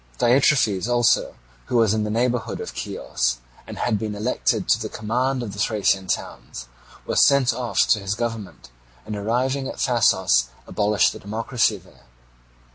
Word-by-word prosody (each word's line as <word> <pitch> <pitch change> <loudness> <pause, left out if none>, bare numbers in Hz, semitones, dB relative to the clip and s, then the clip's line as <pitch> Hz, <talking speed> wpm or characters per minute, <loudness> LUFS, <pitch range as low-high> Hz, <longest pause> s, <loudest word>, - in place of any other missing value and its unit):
Diitrephes 120 - +3
also, 120 -2 +2 0.3
who 125 - 0
was 110 -3 +3
in 110 -1 0
the 105 - -3
neighbourhood 120 +2 -1
of - - -7
Chios, - - -2 0.3
and - - -8
had 110 -4 0
been 110 -2 -4
elected 110 +5 -1
to - - +4
the - - -4
command 125 +4 -1
of 105 -4 -6
the 100 - -9
Thracian 100 -3 +1
towns, 60 -7 -5 0.4
was - - +3
sent 140 -3 +4
off 125 -2 +1
to 105 - +4
his 100 +1 -3
government, 110 - -5 0.3
and 105 - -5
arriving 125 +6 -1
at - - -6
Thasos 95 - +2 0.2
abolished 105 0 +1
the - - -10
democracy 110 +1 -1
there. 90 -8 -21
110 Hz, 160 wpm, -22 LUFS, 100-120 Hz, 0.4 s, to